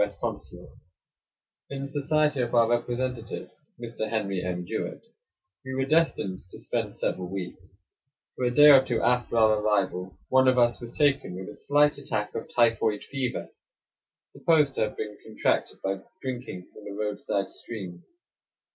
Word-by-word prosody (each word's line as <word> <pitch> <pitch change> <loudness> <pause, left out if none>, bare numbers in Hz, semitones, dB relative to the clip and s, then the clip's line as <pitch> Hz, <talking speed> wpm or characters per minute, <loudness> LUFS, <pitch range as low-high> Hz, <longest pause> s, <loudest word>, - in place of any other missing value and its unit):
S. 105 0 -4
consulate. - - -5 1.0
In 140 -1 -5
the - - -3
society 150 0 +1
of 120 0 -1
our 115 -1 +6
representative, 120 0 -2 0.3
Mr. 115 -2 -4
Henry 100 -4 -1
M. 90 -1 -3
Jewett, 110 +5 -4 0.6
we 130 0 -5
were 135 0 +1
destined 145 - +1
to - - -11
spend - - -3
several 90 -1 -2
weeks; 95 0 -7 0.6
for - - -4
a - - +3
day 145 +4 +8
or 135 -2 +8
two 120 -3 -1
after 120 -1 +1
our 110 -1 +5
arrival, 95 -3 0
one 130 0 +4
of 130 0 +4
us 120 0 +3
was 120 0 -8
taken 140 -10 +2
with 95 0 -7
a - - -8
slight 145 0 +2
attack 105 -6 -3
of - - -5
typhoid 115 -3 +2
fever, 130 -3 -3 0.8
supposed 150 -4 +3
to - - -2
have 105 -1 -1
been 105 -1 -5
contracted 110 - 0
by 95 0 -1 0.2
drinking 125 -8 -5
from 110 - -13
the 100 - -6
roadside 105 -2 -2
streams. 95 -7 -8
115 Hz, 160 wpm, -27 LUFS, 100-130 Hz, 1.0 s, day